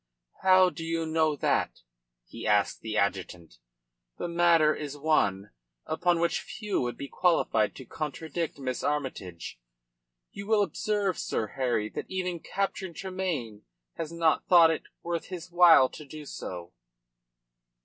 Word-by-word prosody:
"How 185 Hz, -1 st, +6 dB
can 165 Hz, +1 st, -7 dB
you 165 Hz, 0 st, -1 dB
know 160 Hz, -1 st, +1 dB
that?" -, -, 0 dB, 0.4 s
he 115 Hz, -, -7 dB
asked 105 Hz, -1 st, +2 dB
the 110 Hz, -1 st, -3 dB
adjutant. 90 Hz, -, -2 dB, 0.6 s
"The -, -, -3 dB
matter 170 Hz, -2 st, +4 dB
is 145 Hz, -1 st, -6 dB
one 105 Hz, -10 st, +1 dB, 0.3 s
upon 170 Hz, +2 st, +1 dB
which 170 Hz, 0 st, +1 dB
few 210 Hz, -4 st, -3 dB
would 120 Hz, -2 st, -3 dB
be 140 Hz, -, -6 dB
qualified 165 Hz, -, +1 dB
to 130 Hz, -, -10 dB
contradict 155 Hz, +4 st, -4 dB
Miss 130 Hz, -3 st, -4 dB
Armytage. 110 Hz, -, -4 dB, 0.7 s
You 200 Hz, 0 st, -8 dB
will 215 Hz, -2 st, +4 dB
observe, 205 Hz, -2 st, -1 dB
Sir 110 Hz, -, -2 dB
Harry, 125 Hz, -5 st, 0 dB
that -, -, -6 dB
even 180 Hz, -2 st, -2 dB
Captain 190 Hz, -1 st, -3 dB
Tremayne 170 Hz, -, -4 dB, 0.3 s
has 160 Hz, -1 st, -5 dB
not 165 Hz, -1 st, +1 dB
thought 170 Hz, -2 st, +7 dB
it 160 Hz, -, -3 dB, 0.2 s
worth 170 Hz, -1 st, -3 dB
his 180 Hz, -1 st, -8 dB
while 170 Hz, -6 st, +7 dB
to 155 Hz, -, -10 dB
do 150 Hz, +1 st, -10 dB
so." 90 Hz, -9 st, -7 dB
160 Hz, 140 wpm, -28 LUFS, 125-175 Hz, 0.7 s, thought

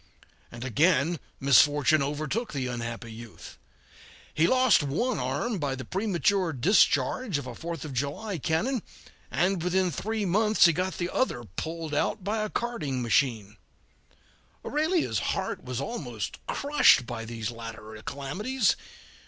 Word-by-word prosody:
And 120 Hz, +2 st, -7 dB
again 155 Hz, -, +2 dB, 0.2 s
misfortune 145 Hz, +2 st, +5 dB
overtook 155 Hz, -, -2 dB
the 135 Hz, -3 st, -2 dB
unhappy 115 Hz, -1 st, -5 dB
youth. 110 Hz, -6 st, -11 dB, 0.7 s
He 160 Hz, +2 st, +3 dB
lost 255 Hz, -6 st, +5 dB
one 190 Hz, -, -1 dB
arm 230 Hz, -5 st, -1 dB
by 140 Hz, -3 st, -1 dB
the 130 Hz, -, -7 dB
premature 195 Hz, -3 st, +1 dB
discharge 190 Hz, -, +2 dB
of 140 Hz, -, -5 dB
a 125 Hz, -, -6 dB
Fourth 165 Hz, +3 st, -6 dB
of 145 Hz, -, -6 dB
July 145 Hz, -, -3 dB
cannon, 200 Hz, -, 0 dB, 0.5 s
and 180 Hz, +1 st, +1 dB
within 180 Hz, +1 st, +1 dB
three 220 Hz, +4 st, -2 dB
months 210 Hz, +4 st, +4 dB
he 170 Hz, -, +5 dB
got 185 Hz, +3 st, -2 dB
the 175 Hz, 0 st, -2 dB
other 120 Hz, -, 0 dB
pulled 160 Hz, -, -5 dB
out 165 Hz, +6 st, 0 dB
by 215 Hz, +3 st, -1 dB
a 215 Hz, -, -2 dB
carding 150 Hz, -, -2 dB
machine. 110 Hz, -3 st, +1 dB, 1.1 s
Aurelia's 315 Hz, +4 st, +1 dB
heart -, -, -2 dB
was -, -, -4 dB
almost -, -, -5 dB
crushed 285 Hz, -, +4 dB
by 115 Hz, -, -5 dB
these 115 Hz, -1 st, -4 dB
latter 115 Hz, -2 st, -9 dB
calamities. 205 Hz, -, 0 dB
160 Hz, 135 wpm, -27 LUFS, 125-205 Hz, 1.1 s, misfortune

